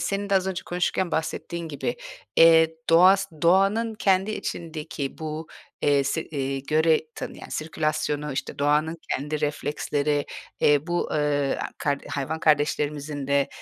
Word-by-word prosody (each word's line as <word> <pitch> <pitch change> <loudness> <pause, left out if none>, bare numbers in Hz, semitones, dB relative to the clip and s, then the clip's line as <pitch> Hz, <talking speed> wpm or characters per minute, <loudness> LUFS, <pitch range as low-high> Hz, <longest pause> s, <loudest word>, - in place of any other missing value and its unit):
senin 200 +3 -2
de - - +3
az 190 -1 +2
önce 190 -2 -3
konuşurken 175 0 -1
bahsettiğin 165 +1 -3
gibi, 145 - -3 0.4
eee, 160 -1 +6 0.2
doğas 190 +4 +6 0.2
doğanın 195 +6 +3
kendi 195 0 +2
içindeki 155 -8 -5
bu, 155 0 -5 0.4
eee, 140 -1 +3
se 160 +4 -1
eee, 135 -2 -3
göre 155 +3 +3
tanıyan - - -7
sirkülasyonu, 155 -2 -2
işte, 135 - -5
doğanın 150 +3 +2 0.2
kendi 150 +3 -3
refleksleri, 145 0 -1 0.3
eee, 145 +2 +3
bu, 175 0 -1
eee, 145 -2 +1 0.2
kar 140 -1 0
hayvan 150 +3 -3
kardeşlerimizin 145 -1 0
de 140 0 +2
155 Hz, 130 wpm, -25 LUFS, 145-170 Hz, 0.4 s, eee